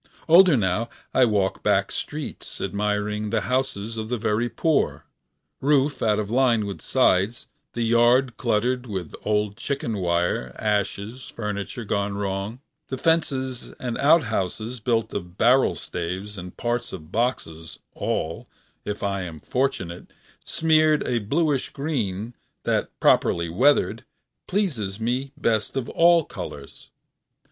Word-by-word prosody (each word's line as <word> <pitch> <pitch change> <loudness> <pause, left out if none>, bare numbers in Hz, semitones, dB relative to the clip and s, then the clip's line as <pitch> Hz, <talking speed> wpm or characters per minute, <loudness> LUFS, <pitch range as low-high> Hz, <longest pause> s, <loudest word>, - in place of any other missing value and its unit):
Older 170 -2 +7
now 105 +3 0 0.2
I 130 - +5
walk 100 -4 0
back 100 -1 +2
streets 150 -1 -6
admiring 105 +1 -1
the 110 0 +1
houses 115 -3 -2
of 110 0 -4
the 125 - 0
very 110 +2 0
poor: 160 +4 0 0.5
roof 145 0 +2
out 105 -2 +2
of 105 0 -2
line 120 -4 +3
with 100 -1 -6
sides 115 -3 +2 0.3
the 120 - -1
yards 120 +2 +4
cluttered 125 +2 0
with 95 -7 -5
old 105 -1 0
chicken 120 -3 -2
wire, 85 -8 0
ashes, 105 +3 -2
furniture 105 +2 -5
gone 100 0 -1
wrong; 100 +4 -3 0.3
the 130 - -4
fences 130 -5 0
and 125 -2 -4
outhouses 115 - +2
built 115 0 0
of 90 -2 -6
barrel 125 +3 +4
staves 90 +4 -5
and 90 -2 -9
parts 120 +1 -2
of 80 -3 -9
boxes, 80 -9 -2 0.2
all, 80 +1 -3 0.4
if 105 0 -4
I 100 -1 -1
am 85 -4 -6
fortunate, 95 - -2 0.3
smeared 155 -1 +3
a 120 -2 +1
bluish 140 +5 0
green 120 -7 -3 0.3
that - - 0
properly 85 0 +3
weathered 135 - +3 0.4
pleases 125 - -1
me 125 +4 -1
best 110 -2 0
of 130 - -2
all 170 -1 +5
colors. - - -9
115 Hz, 130 wpm, -24 LUFS, 100-130 Hz, 0.5 s, Older